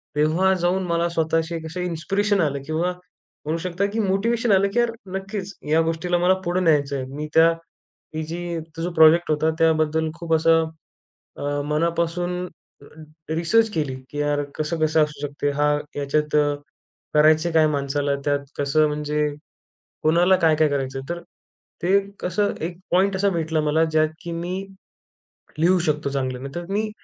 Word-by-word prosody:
तेव्हा 165 Hz, +6 st, +3 dB
जाऊन 180 Hz, +2 st, +1 dB
मला 170 Hz, 0 st, +1 dB
स्वतःशी 165 Hz, 0 st, 0 dB
कसे 180 Hz, +3 st, -4 dB
इन्स्पिरेशन 195 Hz, +5 st, 0 dB
आलं 140 Hz, -3 st, -1 dB
किंवा 165 Hz, +3 st, 0 dB, 0.5 s
म्हणू 155 Hz, +2 st, -1 dB
शकता, 185 Hz, +2 st, -1 dB
की 215 Hz, +3 st, -3 dB
मोटिवेशन 220 Hz, +4 st, +1 dB
आलं, 195 Hz, +1 st, +4 dB
की 240 Hz, -, +2 dB
यार 240 Hz, -1 st, +2 dB, 0.2 s
नक्कीच 195 Hz, 0 st, -5 dB, 0.2 s
या 160 Hz, +2 st, +4 dB
गोष्टीला 165 Hz, +2 st, 0 dB
मला 180 Hz, +2 st, +4 dB
पुढे 175 Hz, +2 st, 0 dB
न्यायचं 145 Hz, -5 st, +2 dB
आहे. 130 Hz, -, -4 dB
मी 150 Hz, +1 st, -4 dB
त्या 165 Hz, +1 st, +7 dB, 0.7 s
ही 160 Hz, -, -2 dB
जी 170 Hz, 0 st, -4 dB, 0.2 s
तो 165 Hz, -, -4 dB
जो 175 Hz, -, -2 dB
प्रोजेक्ट 160 Hz, 0 st, +5 dB
होता 155 Hz, +1 st, +2 dB
त्याबद्दल 160 Hz, 0 st, +2 dB
खूप 170 Hz, -1 st, -2 dB
असं 165 Hz, 0 st, +3 dB, 0.7 s
अ, 145 Hz, 0 st, -2 dB
मनापासून 170 Hz, +3 st, -1 dB, 0.8 s
रिसर्च 170 Hz, +8 st, +2 dB
केली 150 Hz, -5 st, -1 dB, 0.2 s
की 145 Hz, -, -7 dB
यार, 145 Hz, 0 st, +1 dB
कसं-कसं 155 Hz, 0 st, +1 dB
असू 150 Hz, -1 st, -5 dB
शकते? 145 Hz, 0 st, -2 dB
हा 145 Hz, +1 st, +2 dB, 0.2 s
याच्यात 150 Hz, +2 st, -1 dB, 0.8 s
करायचे 155 Hz, +2 st, +4 dB
काय 160 Hz, -1 st, +4 dB
माणसाला? 140 Hz, -1 st, -1 dB
त्यात 145 Hz, -1 st, 0 dB
कसं 150 Hz, +2 st, +3 dB
म्हणजे 150 Hz, 0 st, -1 dB, 0.8 s
कोणाला 175 Hz, +4 st, +4 dB
काय-काय 160 Hz, -3 st, +3 dB
करायचं? 135 Hz, -1 st, -2 dB
तर 170 Hz, -, -3 dB, 0.6 s
ते 190 Hz, +3 st, +4 dB, 0.2 s
कसं 190 Hz, +3 st, 0 dB
एक 170 Hz, +1 st, -4 dB
पॉइंट 190 Hz, +2 st, +3 dB
असा 200 Hz, +1 st, +2 dB
भेटला 160 Hz, -3 st, -1 dB
मला, 155 Hz, +2 st, +2 dB
ज्यात, 155 Hz, -1 st, +2 dB
की 170 Hz, -, -5 dB
मी 175 Hz, +2 st, -3 dB, 1.0 s
लिहू 180 Hz, +4 st, +4 dB
शकतो 150 Hz, -2 st, 0 dB
चांगलं. 130 Hz, -2 st, -2 dB
नाही 140 Hz, 0 st, -7 dB
तर 175 Hz, -, -4 dB
मी 215 Hz, +1 st, 0 dB
160 Hz, 155 wpm, -23 LUFS, 150-180 Hz, 1.0 s, त्या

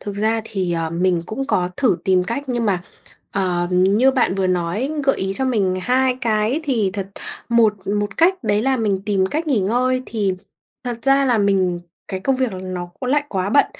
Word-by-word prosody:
thực 205 Hz, -, -6 dB
ra 220 Hz, +2 st, +1 dB
thì, 190 Hz, -5 st, -2 dB
ờ, 165 Hz, -1 st, -1 dB
mình 175 Hz, 0 st, +1 dB
cũng 260 Hz, +7 st, -3 dB
có 180 Hz, -9 st, 0 dB
thử 235 Hz, -10 st, +2 dB
tìm 185 Hz, -1 st, +3 dB
cách, 235 Hz, +7 st, -3 dB
nhưng 240 Hz, -2 st, 0 dB
mà, 185 Hz, -4 st, 0 dB, 0.5 s
ờm, 175 Hz, -3 st, 0 dB
như 195 Hz, +8 st, +4 dB
bạn 255 Hz, -8 st, +1 dB
vừa 195 Hz, -1 st, 0 dB
nói, 185 Hz, -, -1 dB
gợi 270 Hz, -, +3 dB
ý 190 Hz, 0 st, -2 dB
cho 265 Hz, -, 0 dB
mình 205 Hz, -8 st, +1 dB
2 255 Hz, +3 st, +2 dB
cái 225 Hz, +4 st, +1 dB
thì 230 Hz, -9 st, +1 dB
thật, 195 Hz, -1 st, -4 dB, 0.4 s
một 230 Hz, -3 st, +4 dB
một 205 Hz, 0 st, -1 dB
cách 370 Hz, +3 st, +3 dB
đấy 205 Hz, +1 st, +2 dB
là 265 Hz, 0 st, +2 dB
mình 205 Hz, -5 st, 0 dB
tìm 195 Hz, -2 st, +2 dB
cách 310 Hz, -, -2 dB
nghỉ 265 Hz, -8 st, +2 dB
ngơi. 250 Hz, +6 st, +1 dB
Thì 205 Hz, -4 st, -1 dB, 0.5 s
thật 240 Hz, -2 st, -3 dB
ra 275 Hz, +2 st, +4 dB
là 245 Hz, -4 st, +2 dB
mình 190 Hz, -4 st, +1 dB, 0.3 s
cái 190 Hz, -, -3 dB
công 265 Hz, +6 st, +1 dB
việc 255 Hz, -4 st, 0 dB
là 185 Hz, -, -6 dB
nó 185 Hz, -1 st, -5 dB
cũng 255 Hz, -, -3 dB
lại 290 Hz, +1 st, +2 dB
quá 190 Hz, -3 st, -2 dB
bận, 285 Hz, -, +5 dB
210 Hz, 215 wpm, -20 LUFS, 185-255 Hz, 0.5 s, bận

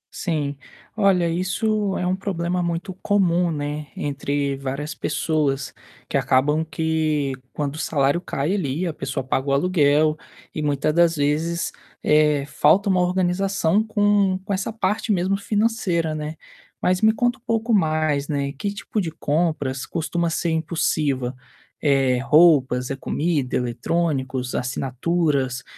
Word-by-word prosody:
Sim, 150 Hz, -5 st, -2 dB, 0.4 s
olha 195 Hz, -5 st, +3 dB
isso 195 Hz, +4 st, 0 dB
é 180 Hz, -, -2 dB
um 180 Hz, +1 st, +1 dB
problema 180 Hz, -2 st, -2 dB
muito 175 Hz, +2 st, -3 dB
comum, 180 Hz, -4 st, +2 dB
né, 150 Hz, 0 st, -4 dB
entre 140 Hz, -1 st, -1 dB
várias 140 Hz, +2 st, -4 dB
pessoas, 145 Hz, -3 st, -1 dB, 0.3 s
que -, -, -5 dB
acabam 150 Hz, +4 st, +2 dB
que 160 Hz, -3 st, 0 dB, 0.2 s
quando 145 Hz, -2 st, -3 dB
o -, -, -6 dB
salário 140 Hz, +2 st, +1 dB
cai 155 Hz, 0 st, -2 dB
ali 165 Hz, -3 st, -1 dB
a 170 Hz, -, -2 dB
pessoa 135 Hz, -2 st, -4 dB
paga 130 Hz, +2 st, -1 dB
o -, -, +1 dB
aluguel 150 Hz, -1 st, +3 dB, 0.4 s
e, 155 Hz, -, -3 dB
muita 150 Hz, 0 st, 0 dB
das 170 Hz, 0 st, +4 dB
vezes, 155 Hz, +3 st, 0 dB, 0.3 s
eh, 150 Hz, -2 st, +3 dB
falta 200 Hz, +7 st, +3 dB
uma 185 Hz, -1 st, +3 dB
organização 185 Hz, +1 st, +1 dB
com 205 Hz, -3 st, +2 dB
com 200 Hz, -, -2 dB
essa 195 Hz, +3 st, -2 dB
parte 215 Hz, 0 st, -1 dB
mesmo 190 Hz, 0 st, +1 dB
financeira, 200 Hz, -6 st, 0 dB
né. 155 Hz, 0 st, -4 dB, 0.4 s
Mas 185 Hz, 0 st, +1 dB
me 220 Hz, 0 st, +6 dB
conta 240 Hz, +3 st, 0 dB
um -, -, -40 dB
pouco 230 Hz, -1 st, 0 dB
mais, 155 Hz, -6 st, +1 dB
né, 140 Hz, -2 st, -1 dB
que 200 Hz, +9 st, -3 dB
tipo 205 Hz, +1 st, -3 dB
de 170 Hz, -, -2 dB
compras 150 Hz, -4 st, -1 dB
costuma 170 Hz, +1 st, -2 dB
ser 165 Hz, +1 st, -1 dB
impulsiva, 150 Hz, -5 st, 0 dB, 0.5 s
eh, 135 Hz, -4 st, +3 dB
roupas, 135 Hz, -3 st, +4 dB
é -, -, -1 dB
comida, 145 Hz, -1 st, -1 dB
eletrônicos, 130 Hz, +1 st, -1 dB
assinaturas? 135 Hz, +1 st, -1 dB
O -, -, -25 dB
160 Hz, 140 wpm, -22 LUFS, 140-185 Hz, 0.5 s, me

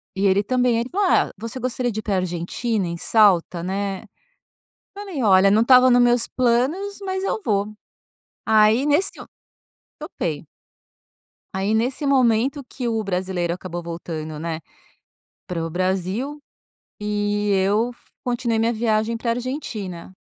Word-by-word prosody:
E 195 Hz, +1 st, 0 dB
ele 195 Hz, +1 st, +3 dB
também, 250 Hz, +1 st, +1 dB
ele 235 Hz, +2 st, -3 dB
falou: 395 Hz, +4 st, +1 dB
"Ah, -, -, +3 dB
você 230 Hz, +4 st, -6 dB
gostaria 250 Hz, 0 st, -2 dB
de 215 Hz, -, -4 dB
ir -, -, -6 dB
pra 205 Hz, -2 st, -1 dB
Argentina, 185 Hz, +4 st, -2 dB
em 170 Hz, 0 st, -4 dB
Salta, 180 Hz, -4 st, +3 dB
né? 195 Hz, +1 st, -3 dB, 0.9 s
Falei: 395 Hz, -8 st, -6 dB
"Olha, 195 Hz, -1 st, +5 dB
não 215 Hz, +2 st, +4 dB
estava 255 Hz, +1 st, +7 dB
nos 245 Hz, 0 st, +5 dB
meus 240 Hz, -1 st, +3 dB
planos, 270 Hz, +12 st, 0 dB
mas 380 Hz, 0 st, -3 dB
eu 390 Hz, -, -1 dB
vou". 205 Hz, -, 0 dB, 0.7 s
Aí, 220 Hz, +4 st, +4 dB
nesse 300 Hz, +6 st, +3 dB
eu -, -, -10 dB, 0.7 s
topei. -, -, -4 dB, 1.1 s
Aí, 195 Hz, +3 st, 0 dB
nesse 250 Hz, +6 st, 0 dB
momento 265 Hz, +1 st, +2 dB
que 250 Hz, -1 st, -5 dB
o 225 Hz, -1 st, -1 dB
brasileiro 180 Hz, -3 st, -2 dB
acabou 175 Hz, -1 st, -6 dB
voltando, 160 Hz, -2 st, -6 dB
né, 165 Hz, 0 st, -4 dB, 0.9 s
para 170 Hz, -2 st, -3 dB
o -, -, -4 dB
Brasil 190 Hz, -, -2 dB, 0.6 s
e 205 Hz, 0 st, -1 dB
eu 205 Hz, +5 st, +1 dB
fu -, -, -29 dB
continuei 240 Hz, -2 st, -1 dB
minha 225 Hz, +1 st, +2 dB
viagem 220 Hz, 0 st, 0 dB
para 230 Hz, +1 st, -2 dB
a -, -, +2 dB
Argentina. 225 Hz, -, -5 dB
220 Hz, 150 wpm, -22 LUFS, 190-250 Hz, 1.1 s, estava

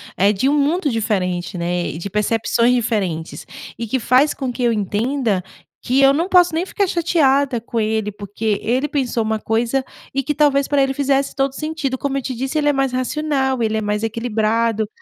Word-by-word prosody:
eh, 200 Hz, +2 st, +3 dB
de 210 Hz, +6 st, 0 dB
mundo 295 Hz, +4 st, +1 dB
diferente, 185 Hz, -5 st, -1 dB
né? 175 Hz, 0 st, -1 dB
E -, -, -5 dB
de 185 Hz, +3 st, -6 dB
percepções 230 Hz, +3 st, +1 dB
diferentes, 195 Hz, -9 st, -2 dB, 0.3 s
e 230 Hz, -, -4 dB
que 260 Hz, +4 st, 0 dB
faz 255 Hz, +6 st, +3 dB
com 265 Hz, -3 st, -3 dB
que 250 Hz, -, -6 dB
eu 240 Hz, -, +3 dB
entenda 215 Hz, 0 st, -1 dB, 0.4 s
que 260 Hz, +3 st, +1 dB
eu 275 Hz, 0 st, +6 dB
não 335 Hz, +6 st, -1 dB
posso 355 Hz, -3 st, +5 dB
nem 325 Hz, +2 st, 0 dB
ficar 400 Hz, +1 st, 0 dB
chateada 285 Hz, -7 st, +2 dB
com 230 Hz, +1 st, -4 dB
ele, 215 Hz, -1 st, -1 dB
porque 205 Hz, +1 st, -3 dB
ele 255 Hz, +6 st, 0 dB
pensou 255 Hz, -5 st, -1 dB
uma 220 Hz, 0 st, -1 dB
coisa 230 Hz, +5 st, 0 dB, 0.3 s
e 275 Hz, -, +1 dB
que 290 Hz, +2 st, -2 dB
talvez 280 Hz, -2 st, +3 dB
para 285 Hz, -1 st, +3 dB
ele 270 Hz, 0 st, 0 dB
fizesse 275 Hz, 0 st, 0 dB
todo 270 Hz, -1 st, 0 dB
sentido. 305 Hz, -3 st, -3 dB
Como 275 Hz, +1 st, -2 dB
eu -, -, -1 dB
te 255 Hz, -1 st, -4 dB
disse, 265 Hz, +5 st, -3 dB
ele 295 Hz, -1 st, +2 dB
é 290 Hz, -, +3 dB
mais 270 Hz, -1 st, 0 dB
racional, 265 Hz, -1 st, -1 dB
ele 220 Hz, 0 st, 0 dB
é -, -, -1 dB
mais 210 Hz, +1 st, -2 dB
equilibrado. 225 Hz, -1 st, 0 dB
245 Hz, 200 wpm, -19 LUFS, 215-275 Hz, 0.4 s, eu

